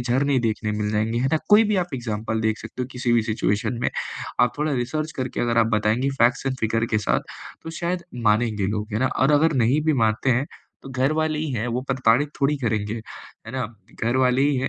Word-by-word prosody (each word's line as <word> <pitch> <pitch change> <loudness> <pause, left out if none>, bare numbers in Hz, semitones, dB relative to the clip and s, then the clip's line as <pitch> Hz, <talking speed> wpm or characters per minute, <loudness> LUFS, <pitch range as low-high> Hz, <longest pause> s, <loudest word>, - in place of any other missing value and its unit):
झरने 130 +3 +1
देखने 110 -2 -1
मिल 105 0 -1
जाएँगे, 110 +2 0
है 130 +2 +1
ना, 160 - +4
कोई 210 +2 +7
भी 210 - +2
आप 175 - -9
एग्ज़ाम्पल 110 -2 -3
देख 110 -1 0
सकते 115 +3 -6
हो, - - -3
किसी 125 -1 0
भी 115 -2 +4
सिचुएशन 110 +1 -1
में। - - +1 0.5
आप 120 - +4
थोड़ा 150 0 0
रिसर्च 150 +5 -2
करके 130 -1 -3
अगर 115 -1 +1
आप 115 - +4
बताएँगे 110 +6 +1
फ़ैक्ट्स 120 +3 +3
एण्ड 130 -1 -1
फिगर 115 +1 +1
के 110 - +4
साथ, - - +1 0.4
तो 160 - -6
शायद 175 0 -2 0.2
मानेंगे 105 -2 +1
लोग, 105 +1 -2
है 105 - 0
ना। 130 - +3
और 135 +3 +4
अगर 155 +2 +4
नहीं 130 +7 +3
भी 155 - +3
मानते 110 +4 +1
हैं, 130 +3 +1 0.4
तो - - -9
घरवाले 155 +4 0
ही 155 -1 -2
हैं, 115 -1 -2
वो 120 +1 -1
प्रताड़ित 130 +1 +3
थोड़ी 140 +2 +2
करेंगे, 110 -3 -1 0.5
है 115 - -8
ना। 130 -1 -1 0.4
घरवाले 125 +2 +2
ही 145 0 +2
हैं, 130 +1 0
125 Hz, 220 wpm, -23 LUFS, 110-140 Hz, 0.5 s, कोई